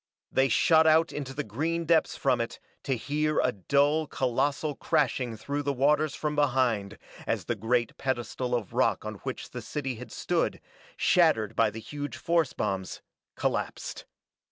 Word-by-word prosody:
They 135 Hz, 0 st, +3 dB
shot 160 Hz, +6 st, +5 dB
out 160 Hz, +1 st, +4 dB
into 140 Hz, -3 st, -4 dB
the 145 Hz, +2 st, -3 dB
green 165 Hz, +4 st, -2 dB
depths 165 Hz, 0 st, +2 dB
from 125 Hz, -4 st, +2 dB
it 115 Hz, -, -5 dB, 0.3 s
to 135 Hz, -, +1 dB
hear 150 Hz, +4 st, 0 dB
a 125 Hz, -, +3 dB
dull, 145 Hz, -, +2 dB
colossal 140 Hz, +4 st, 0 dB
crashing 125 Hz, -4 st, 0 dB
through 145 Hz, +6 st, -3 dB
the 145 Hz, 0 st, 0 dB
waters 145 Hz, +3 st, +2 dB
from 150 Hz, -1 st, -2 dB
behind 125 Hz, -8 st, +1 dB, 0.3 s
as -, -, -1 dB
the -, -, 0 dB
great 115 Hz, +2 st, 0 dB
pedestal 125 Hz, -1 st, -2 dB
of 115 Hz, -6 st, -4 dB
rock -, -, +1 dB
on -, -, -5 dB
which -, -, -6 dB
the -, -, -6 dB
city 135 Hz, -5 st, -4 dB
had 120 Hz, -1 st, -9 dB
stood, -, -, -1 dB, 0.4 s
shattered 155 Hz, -, +3 dB
by 115 Hz, -1 st, +4 dB
the 110 Hz, +2 st, -7 dB
huge 145 Hz, +5 st, -6 dB
force 165 Hz, -5 st, +1 dB
bombs, 95 Hz, -2 st, -3 dB, 0.3 s
collapsed. -, -, -3 dB
135 Hz, 160 wpm, -28 LUFS, 120-150 Hz, 0.4 s, shot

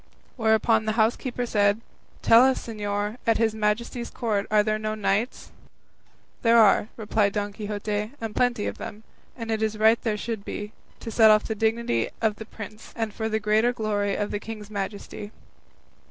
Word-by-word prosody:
Whereupon 220 Hz, -1 st, +2 dB
the 215 Hz, -, 0 dB
housekeeper 240 Hz, +2 st, +1 dB
said, 205 Hz, -2 st, +2 dB, 0.4 s
"Tell 230 Hz, +1 st, +7 dB
us, 265 Hz, 0 st, +2 dB
señor, 210 Hz, 0 st, -3 dB
at 225 Hz, -, +4 dB
his 225 Hz, -1 st, +2 dB
Majesty's 220 Hz, +3 st, -1 dB
court 210 Hz, -4 st, -1 dB
are 210 Hz, -1 st, +4 dB
there 215 Hz, 0 st, 0 dB
no 215 Hz, 0 st, -2 dB
knights?" 215 Hz, +3 st, -1 dB, 0.9 s
"There 235 Hz, -1 st, +5 dB
are," 210 Hz, -2 st, +5 dB
replied 210 Hz, -2 st, +1 dB
Don 205 Hz, -1 st, -2 dB
Quixote, 210 Hz, 0 st, -3 dB
"and 225 Hz, -2 st, -5 dB
plenty 245 Hz, -4 st, +1 dB
of -, -, -4 dB
them; 215 Hz, +2 st, -8 dB, 0.3 s
and 230 Hz, -2 st, -4 dB
it 220 Hz, 0 st, -1 dB
is 220 Hz, -1 st, 0 dB
right 220 Hz, +2 st, +4 dB
there 215 Hz, -3 st, -1 dB
should 225 Hz, -1 st, -4 dB
be, 210 Hz, +1 st, -6 dB, 0.3 s
to 225 Hz, -, -6 dB
set 220 Hz, -1 st, +6 dB
off 215 Hz, 0 st, +5 dB
the 220 Hz, -, -3 dB
dignity 220 Hz, -, 0 dB
of 215 Hz, -2 st, 0 dB
the 220 Hz, -, -8 dB
prince, 215 Hz, 0 st, -10 dB
and 225 Hz, -2 st, -2 dB
for 220 Hz, 0 st, -3 dB
the 220 Hz, 0 st, 0 dB
greater 215 Hz, +3 st, +2 dB
glory 205 Hz, -3 st, -1 dB
of 205 Hz, -, -2 dB
the 205 Hz, -, -2 dB
king's 215 Hz, -1 st, -8 dB
majesty." 205 Hz, 0 st, -5 dB
215 Hz, 180 wpm, -25 LUFS, 210-225 Hz, 0.9 s, Tell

